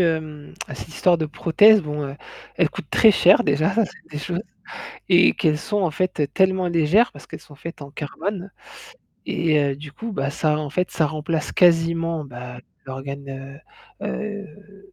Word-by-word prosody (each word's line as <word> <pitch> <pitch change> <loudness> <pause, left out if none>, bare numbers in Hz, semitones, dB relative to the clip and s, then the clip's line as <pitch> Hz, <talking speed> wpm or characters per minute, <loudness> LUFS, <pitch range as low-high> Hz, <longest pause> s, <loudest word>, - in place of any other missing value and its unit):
hem, 155 -3 -2 0.2
cette - - -8
histoire 175 +2 +2
de 160 - -1
prothèse, 205 +8 +5
bon, 150 -1 -4
heu, 135 +1 -8 0.4
elle - - +2
coûte - - -8
très 220 - +6
cher 185 0 +5
déjà, 150 +1 +1
ça 225 -1 +3
c'est 180 - -13
des 150 - -5
choses, 175 +5 -3 0.7
et 180 0 +6
qu'elles 155 -3 +1
sont 205 +5 -2
en 170 -4 +1
fait 160 -4 -1
tellement 190 -1 +2
légères 170 +8 +3
parce 145 - -14
qu'elles - - -9
sont 145 - -16
faites 165 +1 -9
en 140 0 -9
carbone. 180 +6 -5 0.8
Et 160 -3 +1
heu, 140 -2 0
du 150 0 -10
coup, 230 +5 -6
bah 135 -6 -2
ça, 150 +1 0
en 150 -2 -4
fait, 180 +3 -1
ça 155 - +1
remplace 155 +1 -3
quasiment, 165 -2 +2
bah 125 -1 -9 0.3
l'organe, 135 +1 -7 0.4
heu - - -2
heu, 200 -1 -7
160 Hz, 175 wpm, -22 LUFS, 145-185 Hz, 0.8 s, très